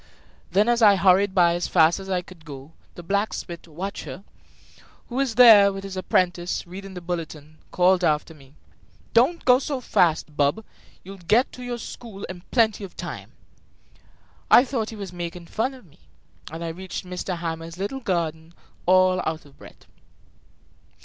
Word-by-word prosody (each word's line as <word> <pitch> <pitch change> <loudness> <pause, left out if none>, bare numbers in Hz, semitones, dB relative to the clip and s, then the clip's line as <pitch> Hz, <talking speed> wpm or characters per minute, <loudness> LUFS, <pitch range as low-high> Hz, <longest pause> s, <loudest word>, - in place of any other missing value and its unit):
Then, 200 +5 +2
as 240 0 +2
I 205 -2 +7
hurried 190 +1 +3
by 175 -2 +5
as 175 +1 -2
fast 165 +1 +4
as 195 0 -9
I 180 -1 -1
could 175 -3 -15
go, 140 -1 -10 0.2
the 175 - -9
blacksmith, 195 -2 -3
Wachter, 185 +3 -7 0.9
who 240 - -7
was 270 -4 0
there, 215 -5 +8
with 195 0 -7
his 195 -1 -7
apprentice, 180 -1 0
reading 190 +2 -9
the 180 - -7
bulletin, 155 -3 -6
called 180 0 +3
after 155 0 0
me: 140 -2 -19 0.6
"Don't 265 +9 +3
go 250 0 +6
so 280 -1 -3
fast, 165 -9 +1
bub; 145 +10 +1 0.4
you'll 195 +2 -10
get 215 +9 +2
to 250 - -11
your 245 -1 -4
school 225 -3 -9
in 180 -1 -7
plenty 220 -4 +2
of 190 - -10
time!" - - -7 1.2
I 245 - +7
thought 235 -4 -3
he 225 - -8
was 200 -4 -7
making 175 0 -6
fun 240 +9 -2
of 250 -5 -16
me, 160 0 -24 0.5
and 165 0 -5
reached 185 0 -7
M. 180 0 -7 0.2
Hamel's 165 0 -5
little 205 +8 -4
garden 170 -6 -3 0.3
all 185 0 +4
out 160 -1 -4
of 140 -1 -19
breath. - - -15
185 Hz, 165 wpm, -24 LUFS, 170-210 Hz, 1.2 s, there